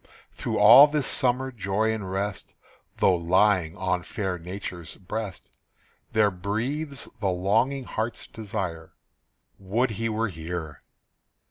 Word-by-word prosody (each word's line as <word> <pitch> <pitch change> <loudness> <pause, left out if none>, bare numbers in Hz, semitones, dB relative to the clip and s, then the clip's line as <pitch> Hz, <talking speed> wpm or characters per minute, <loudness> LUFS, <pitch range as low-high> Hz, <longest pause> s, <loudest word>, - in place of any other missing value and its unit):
Through - - -3
all 120 +8 +9
this 150 -2 -1
summer 130 0 0
joy 110 0 0
and 105 -4 -5
rest, 100 +1 -4 0.4
Though 95 - +4
lying 90 0 +2
on 90 -1 0
fair 95 -1 -4
Nature's 90 -1 -7
breast, 100 0 -6 0.6
There 105 -2 +4
breathes 125 - -3
the 100 - 0
longing 110 +9 +1
heart's 115 -1 -4
desire, 90 -6 -5 0.6
Would 110 +6 0
he 115 +2 -2
were 110 0 -1
here! 80 -3 -6
100 Hz, 120 wpm, -26 LUFS, 90-115 Hz, 0.6 s, all